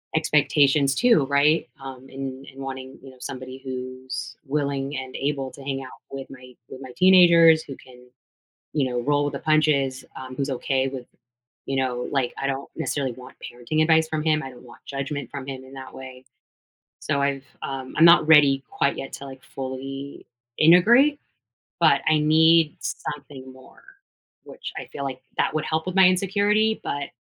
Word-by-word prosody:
expectations, 145 -2 +3
too, 230 - +4
right? 145 +3 +2
Um, 135 -1 -10
and 135 0 -6
and 135 - -15
wanting, 130 -1 -7
you 135 - -11
know, 130 - -19
somebody 130 +1 -8
who's 130 0 -6
willing 140 -1 -2
and 130 -1 -7
able 135 -2 -2
to - - -13
hang 135 0 -4
out 130 - -13
with 135 -1 -7
my 130 -2 -13
with 130 - -11
my 130 -2 -9
teenagers, 170 -3 +6
who 135 - -9
can, 125 -1 -17 0.7
you 140 -4 0
know, 125 -1 -2
roll 145 +2 +1
with 145 - -2
the - - -4
punches, 140 -4 +1 0.2
um, 130 -1 -8
who's 140 +1 -2
okay 135 0 -1
with, 130 -2 -7 0.6
you 135 - -3
know, 125 -2 -1
like 135 -3 0
I 140 - -1
don't 135 0 -4
necessarily 135 -3 -2
want 125 +1 -13 0.2
parenting 125 +6 -2
advice 160 0 +4
from 155 -1 -3
him, 155 -1 +2
I 135 - -7
don't 125 -2 -15
want 120 -1 -15
judgment 140 +1 -5
from 140 -2 -7
him 130 -1 -7
in 130 - -15
that 135 -1 -10
way, 130 -1 -11 0.8
so 140 - -1
I've, 140 -1 -1 0.2
um 135 -1 -6
I'm 165 - +7
not 170 -2 +7
ready 145 -3 +6
quite 140 - 0
yet 135 - -6
to, 140 - -8
like, 135 -1 -11
fully 135 +1 -7 0.3
integrate, 235 - +5 0.6
but 160 -5 +4
I 155 -1 +4
need 160 +1 +4
something 140 -3 -7
more, 130 0 -18 0.6
which - - -9
I - - -6
feel, 140 - -5
like, 130 -1 -5 0.2
that - - +1
would 155 - -1
help 160 0 -2
with 185 0 -4
my 190 -1 +7
insecurity, 205 +4 +1
but 140 0 -4
135 Hz, 180 wpm, -24 LUFS, 130-155 Hz, 0.8 s, I'm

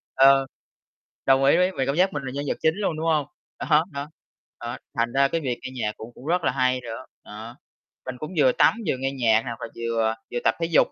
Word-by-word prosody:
ờ, 135 0 +6 0.8
đồng 135 0 +4
ý 140 +4 +5
ví 180 +1 +3
vì 135 - +1
cảm 140 - 0
giác 185 +1 +3
mình 145 - -3
là 130 -1 -5
nhân 140 +1 -3
vật - - -1
chính 160 0 +3
luôn, 195 -6 -1
đúng 160 - -3
hông? 155 -3 +2 0.3
Đó, 155 0 +3
đó, 140 +1 -5 0.5
đó, 120 +1 -5 0.2
thành 120 0 0
ra 140 0 +3
cái 165 - -1
việc 125 -5 -2
nghe - - -6
nhạc 105 0 0
cũng 115 +2 -10
cũng 130 - -13
rất 175 +1 +1
là - - +2
hay 130 -1 +1
nữa, 115 +1 -7 0.2
đó. 110 +3 -10 0.5
Mình 130 -1 -5
cũng 155 +6 -6
vừa 130 -4 +5
tắm - - +4
vừa 145 - +1
nghe 135 +1 -2
nhạc 115 -4 +3
hoặc 115 -2 -5
là - - -4
vừa 115 -1 0 0.2
vừa 120 - -1
tập 115 - +3
thể 165 - +1
dục 165 -1 +4
135 Hz, 245 wpm, -24 LUFS, 120-150 Hz, 0.8 s, ờ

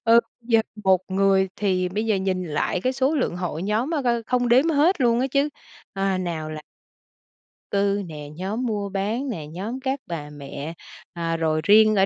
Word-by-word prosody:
Ờ, 230 +1 +7 0.2
giờ 230 -1 +3 0.2
1 190 -1 +5
người 190 0 +3
thì 185 -3 +1
bây 210 +4 -2
giờ 215 - +2
nhìn 190 -1 -1
lại 160 +3 -1
cái 255 +4 +1
số 270 +3 +1
lượng 255 - 0
hội 175 -2 -3
nhóm 215 +8 0
á 310 -4 0
coi 235 -2 +1
không 245 +1 0
đếm 260 +7 +5
hết 310 +4 +3
luôn 240 -1 +3
á 260 - +2
chứ, 280 +1 +3 0.4
ơ, 195 -1 0
nào 165 -4 -3
là 155 0 -6 1.1
cư 200 0 +2
nè, 150 -3 -8
nhóm 205 +8 -3
mua 205 -3 -2
bán 215 +8 -2
nè, 155 -9 -5
nhóm 205 +11 -5
các 265 +1 -1
bà 155 -4 -5
mẹ, 145 +2 -7 0.4
ờ, 165 -1 -2
rồi 155 -1 +1
riêng 215 +4 +6
ở 195 0 +5
200 Hz, 195 wpm, -24 LUFS, 175-240 Hz, 1.1 s, Ờ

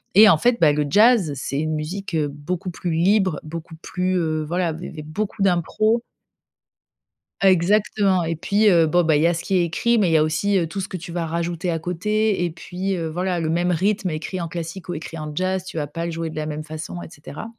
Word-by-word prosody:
Et 215 +2 +9
en 165 - +6
fait, 240 +8 +2
bah, 155 -3 +6
le 150 0 0
jazz, 210 - +5
c'est 135 +1 -3
une 155 +1 -1
musique, 175 +6 -5
heu, 155 -2 +1
beaucoup 150 +6 -4
plus 175 0 -4
libre, 185 0 +2
beaucoup 160 +1 -8
plus, 185 +1 -1
heu, 155 -2 0
voilà, 170 -1 -1
il 180 - -7
y - - -6
avait 155 - -8
beaucoup 195 +7 -4
d'impro 195 +5 +2 1.4
Exactement 195 0 +3
et 165 0 -1
puis, 205 +6 +2
heu, 170 -5 +5
bon 175 +3 +3
beh, 160 -2 +3
il - - +1
y 165 - +5
a 170 - +2
ce 170 - -4
qui 195 - +1
est 175 - +3
écrit, 235 +8 +1
mais 195 -4 +3
il - - +1
y - - +6
a 155 - +4
aussi, 160 +6 +1
heu, 175 - +1
tout 195 +5 -4
ce 190 - -4
que 185 - -5
tu 175 0 -9
vas 170 -1 -2
rajouter 170 +2 -2
à 165 - 0
côté 200 +4 0
et 175 - 0
puis, 180 +4 -4
heu, 165 -2 -3
voilà. 180 +2 -1
Le 160 -1 -1
même 175 +2 +1
rythme 195 +3 +1
écrit 165 +3 -4
en 170 - -3
classique 165 +1 -6
ou 175 - -2
écrit 165 +1 -7
en 155 0 -5
jazz, 185 +2 0
tu 180 -3 -8
vas 150 - -1
pas 165 +4 -5
le 170 - -3
jouer 165 0 -4
de - - -10
la 155 0 -3
même 155 0 -4
façon 155 +3 -7
et - - -10
cetera. 150 +2 -9
170 Hz, 250 wpm, -22 LUFS, 160-190 Hz, 1.4 s, Et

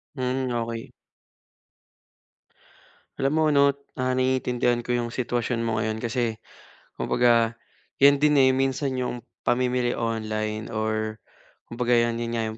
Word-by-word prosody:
Hmm, 130 -1 -1
okey. 115 -1 -4 2.2
Alam 135 +1 0
mo 160 +1 +2
ano, 140 -1 +5 0.2
ah, 130 0 0
naiintindihan 125 -2 +1
ko 125 - -4
'yong 120 -1 0
sitwasyon 120 -1 -1
mo 115 -1 0
ngayon 110 +1 -2
kasi 120 -1 -1 0.6
kumbaga 115 -1 +2 0.4
'yan 140 0 +5
din, 150 -1 +4
eh, 130 -1 +5
minsan 135 +1 0
'yong 125 -2 -3 0.2
pamimili 125 0 +1
online 110 -1 -2
or 110 -1 -2 0.5
kumbaga 120 0 +1
'yan, 115 0 +1
yung 115 0 -3
nga 115 - 0
yung - - -12
120 Hz, 130 wpm, -25 LUFS, 115-130 Hz, 2.2 s, ano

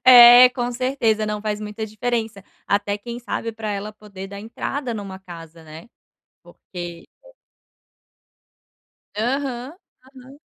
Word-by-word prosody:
É, 245 0 +10
com 245 -1 -2
certeza. 235 -4 0
Não, 210 0 -2
faz 210 -1 -2
muita 210 +1 -5
diferença. 220 -2 -3 0.2
Até 205 0 0
quem 235 +3 -7
sabe 230 -1 -4
pra 220 -1 -5
ela 205 +1 -4
poder 200 -2 -10
dar 200 0 -8
entrada 240 +3 -4
numa 195 -3 -6
casa, 165 -3 -12
né, 160 +7 -12 0.5
porque 175 -2 -9 2.1
Aham, 255 +3 -2 0.3
aham. 265 +1 -15
220 Hz, 120 wpm, -22 LUFS, 200-245 Hz, 2.1 s, É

